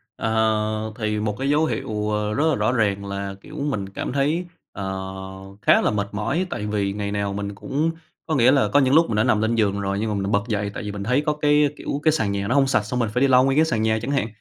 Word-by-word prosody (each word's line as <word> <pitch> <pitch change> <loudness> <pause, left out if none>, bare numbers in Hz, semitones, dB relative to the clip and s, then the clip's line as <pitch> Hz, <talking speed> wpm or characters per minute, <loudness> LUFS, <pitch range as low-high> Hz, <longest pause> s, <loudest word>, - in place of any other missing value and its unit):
Ờ, 110 -1 0
thì 105 -1 -1
một 105 -1 -2
cái 135 +1 -1
dấu 150 +2 +3
hiệu, 105 -8 -2
ờ, 105 0 -1
rất 150 +6 +1
là 145 - +2
rõ 105 +3 +1
ràng 100 -4 0
là, 100 0 -4
kiểu, - - -12
mình 130 -10 -2
cảm 100 - -5
thấy, 150 +6 0 0.3
ờ, 100 - -6 0.8
khá - - +5
là - - +1
mệt 100 -1 -1
mỏi, 115 - -1
tại 105 - -4
vì 100 -2 -1
ngày 100 -1 -3
nào 100 -1 -2
mình 100 0 -4
cũng, 150 +9 -1 0.3
có 155 - -1
nghĩa 125 0 +5
là, 135 -1 +3
có 145 - +3
những 135 0 +3
lúc 165 +2 +5
mình 110 - -1
đã 105 - +3
nằm 105 - +2
lên 110 +1 +1
giường 100 -3 +1
rồi 100 0 -2
nhưng 110 0 -1
mà - - -1
mình 100 -1 -2
lại 100 - -2
bật 100 -1 +2
dậy, 105 -3 -1
tại - - -6
vì 105 - -4
mình 100 -1 -5
thấy 125 +6 +2
có, 150 - +2
cái 150 0 +3
kiểu, 140 - -3
cái 155 - +5
sàn 110 -10 0
nhà 100 0 -2
nó 125 - +1
hông 135 -1 +4
sạch 110 -5 +2
xong 125 +4 -3
mình 115 -3 0
phải 125 - 0
đi 140 - +5
lau 130 -1 +5
nguyên 135 +2 +1
cái 160 - +5
sàn 110 -8 -1
nhà 110 0 +1
chẳng 130 +4 -3
hạn. 135 -6 +1
110 Hz, 285 wpm, -23 LUFS, 100-135 Hz, 0.8 s, khá